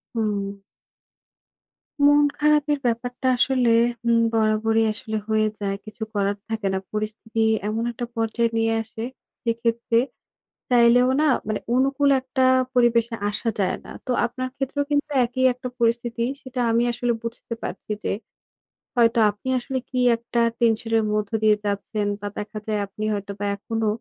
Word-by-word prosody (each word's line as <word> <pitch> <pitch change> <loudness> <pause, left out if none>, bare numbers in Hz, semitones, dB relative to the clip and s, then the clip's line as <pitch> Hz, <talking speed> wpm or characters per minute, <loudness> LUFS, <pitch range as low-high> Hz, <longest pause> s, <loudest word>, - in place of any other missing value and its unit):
হুম। 200 -3 -2 1.5
মন 290 0 +6
খারাপের 295 -1 +3
ব্যাপারটা 245 +2 -2
আসলে 250 -2 +3 0.3
হু, 235 - 0 0.2
বরাবরই 225 0 +2
আসলে 220 +1 -4
হয়ে 215 0 +2
যায়। 195 -1 -1
কিছু 215 +1 -11
করার 200 0 +1
থাকে 225 -2 -2
না। - - +1
পরিস্থিতি 215 +1 -3 0.3
এমন 225 +2 -1
একটা 240 +1 -5
পর্যায়ে 230 +1 +1
নিয়ে 225 0 +2
আসে, 225 0 -7 0.4
সেক্ষেত্রে 230 0 +1 0.7
চাইলেও 245 +1 +5
না 310 - +3 0.2
মানে 215 - -1
অনুকূল 275 +2 +3
একটা 260 0 0 0.3
পরিবেশে 235 -1 +3 0.2
আসা 215 +3 -1
যায় 195 - +1
ন। - - -13 0.2
তো 255 - 0
আপনার 255 +2 -4
ক্ষেত্রেও 280 +1 -1
কিন্তু 290 +1 +1 0.2
একই 250 +2 -2
একটা 250 +1 -6
পরিস্থিতি। 235 0 +1 0.2
সেটা 255 -1 -5
আমি 230 +1 +3
আসলে 240 0 0
বুঝতে 230 0 -6
পারছি - - -7
যে, - - 0 0.8
হয়তো 230 -1 +4
আপনি 205 +5 -8
আসলে 265 +2 -4
কি 255 - -2 0.2
একটা 235 +1 -2 0.2
টেনশন 225 0 +1
এর - - 0
মধ্য 210 -1 -1
দিয়ে 215 -1 +6
যাচ্ছেন, 205 +1 -2
বা 205 - -5
দেখা 210 +1 -5
যায় 215 -1 0
আপনি 205 +2 -7
হয়তোবা 200 0 -4
এখনো 225 +2 -2
230 Hz, 145 wpm, -23 LUFS, 215-245 Hz, 1.5 s, মন